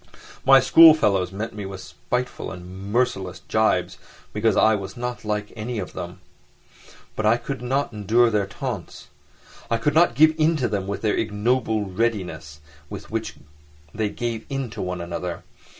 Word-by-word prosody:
My 135 0 +8
schoolfellows 125 - +6
met 105 +4 -5
me 105 -1 -6
with 95 -1 -7
spiteful 125 +7 -4
and 95 +2 -9
merciless 105 -7 -1
jibes 95 -5 0 0.3
because 105 0 +1
I 110 - +5
was 100 0 -4
not 125 0 -4
like 105 -1 -3
any 115 +2 -4
of 95 - -5
them. - - -7 0.9
But 110 - 0
I 115 +2 +5
could 135 +1 -6
not 130 +1 -1
endure 115 +3 +3
their 105 -2 +1
taunts; 110 -4 -6 0.6
I 115 - +2
could 145 +6 0
not 160 -6 +4
give 155 +3 +6
in 160 +1 +3
to 130 -4 0
them 100 -2 -2
with 100 +2 -4
the 110 - +2
ignoble 110 0 0
readiness 90 -8 -3 0.3
with - - -9
which - - -3 0.6
they 110 -2 -1
gave 115 0 -4
in 135 -4 -3
to - - -6
one 90 -1 -3
another. 85 +1 -5
110 Hz, 165 wpm, -23 LUFS, 95-125 Hz, 0.9 s, My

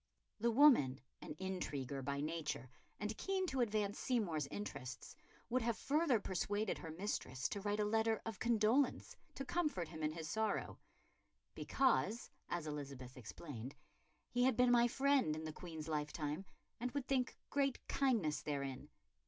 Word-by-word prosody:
'" - - -50
The 235 +2 +3
woman, 230 - +6 0.2
an - - -6
intriguer 145 -8 -3
by 140 +1 -2
nature 150 -5 -3 0.3
and 210 +1 -2
keen 385 -1 0
to 265 -7 0
advance 210 -3 0
Seymour's 175 - 0
interests, 130 -11 -6 0.3
would 255 +2 +1
have 230 -1 0
further 290 -4 +3
persuaded 205 +2 -1
her 165 - -6
mistress 155 -7 -2
to 200 - -3
write 205 +1 0
a 210 - +3
letter 220 +1 +2
of 225 -3 -4
condolence 235 +3 +2 0.2
to 275 - -4
comfort 295 - 0
him 160 -2 -7
in 155 0 0
his 160 -1 -5
sorrow, 220 +4 -1 0.7
"because," 245 -4 +1 0.2
as 175 -2 -2
Elizabeth 140 -4 -6
explained, 130 +1 -7 0.6
"he 245 - +1
had 260 -3 +3
been 250 0 +5
my 240 0 +6
friend 265 - +3
in 155 - -5
the 155 -1 -4
Queen's 160 -2 -7
lifetime 150 +2 -2 0.3
and 250 +2 -1
would 280 -2 -1
think 260 -2 0
great 275 -2 +2
kindness 225 - +2
therein. 140 -1 -3
205 Hz, 155 wpm, -38 LUFS, 150-245 Hz, 0.7 s, woman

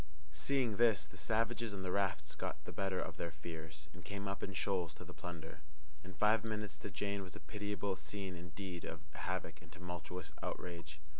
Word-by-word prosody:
Seeing 115 - +3
this, 115 -4 +7
the - - -13
savages 115 -1 +2
on 95 - -2
the 90 - +1
rafts 85 -7 +2
got - - -2
the - - -3
better 95 -1 +2
of - - -2
their 85 - 0
fears, 80 -1 -5
and - - -9
came 100 0 -2
up 100 0 -1
in 100 - -1
shoals 90 -4 +2
to - - -7
the - - -8
plunder. 85 -1 -5 0.4
In 95 0 -8
five 105 0 +6
minutes 105 -2 -1
the - - -4
Jane 100 +2 +1
was 95 -1 -6
a - - -5
pitiable 100 +2 0
scene 95 -1 -3
indeed 90 +1 -4
of 80 - -3
havoc 90 -4 -1
and 80 - -13
tumultuous 90 -1 -4
outrage. 85 -4 -3
95 Hz, 195 wpm, -40 LUFS, 85-100 Hz, 0.4 s, this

